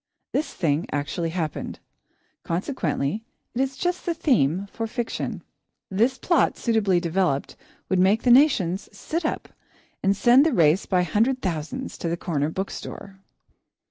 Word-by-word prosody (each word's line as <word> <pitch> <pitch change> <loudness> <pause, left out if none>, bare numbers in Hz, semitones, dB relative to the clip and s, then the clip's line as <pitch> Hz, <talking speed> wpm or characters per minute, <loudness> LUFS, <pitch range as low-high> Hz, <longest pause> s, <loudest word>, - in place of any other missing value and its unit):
This 300 0 0
thing 155 -2 0
actually 145 +4 -2
happened; 160 -3 -3 0.6
consequently 170 - -2 0.3
it 245 - 0
is 270 0 -1
just 355 +3 -1
the 340 - -1
theme 195 - +2
for 225 0 -3
fiction. 235 +1 -4 0.5
This 235 +7 +2
plot, 340 +7 +2
suitably 210 -6 +2
developed, 170 -5 0 0.3
would 185 - +1
make 195 +5 +3
the 245 - +4
nations 220 - +4
sit 330 +2 -4
up, - - -2 0.5
and 195 0 +2
send 245 +5 +6
the 315 -2 +2
race 165 -1 +3
by 180 -2 +2
hundred 230 +9 +1
thousands 180 - -4
to 170 - -2
the 170 - -1
corner 150 -4 -1
bookstore. 195 +2 -6
195 Hz, 140 wpm, -24 LUFS, 170-255 Hz, 0.6 s, send